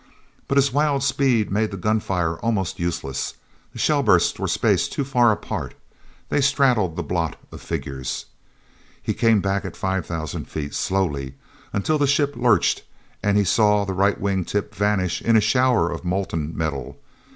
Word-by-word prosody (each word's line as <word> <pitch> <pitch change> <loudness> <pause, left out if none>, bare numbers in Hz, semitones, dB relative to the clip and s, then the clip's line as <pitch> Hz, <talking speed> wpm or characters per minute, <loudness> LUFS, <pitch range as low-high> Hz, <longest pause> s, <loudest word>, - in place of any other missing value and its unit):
But 140 - 0
his 140 -1 +3
wild 145 -1 +2
speed 130 -6 +2
made 110 +2 +1
the 100 - -6
gunfire 90 -5 0
almost 105 -6 -1
useless. 75 -6 -3 0.4
The - - -12
shell - - +2
bursts - - +3
were - - -1
spaced - - +1
too 140 - -1
far 125 -4 +3
apart; 105 - -4 0.5
they 145 - +1
straddled 130 - +2
the 85 - -3
blot 85 0 -2 0.2
of - - -10
figures. 65 -2 -4 0.7
He - - -2
came 115 -3 +3
back 100 0 0
at - - -7
five 95 -3 -2
thousand 80 -3 -5
feet, 75 -2 -5
slowly—until 95 - -2
the 145 - +3
ship 140 +1 +2
lurched, 120 -4 +2 0.4
and 100 0 +2
he 105 - +4
saw 105 +1 +3
the 95 - -3
right 100 +2 +2
wing 95 -2 0
tip 100 +4 -3
vanish 100 -3 0
in 115 -1 +4
a - - +7
shower 110 -4 +2
of 85 - -5
molten 90 -4 -2
metal. 75 -6 -3
100 Hz, 165 wpm, -23 LUFS, 85-120 Hz, 0.7 s, a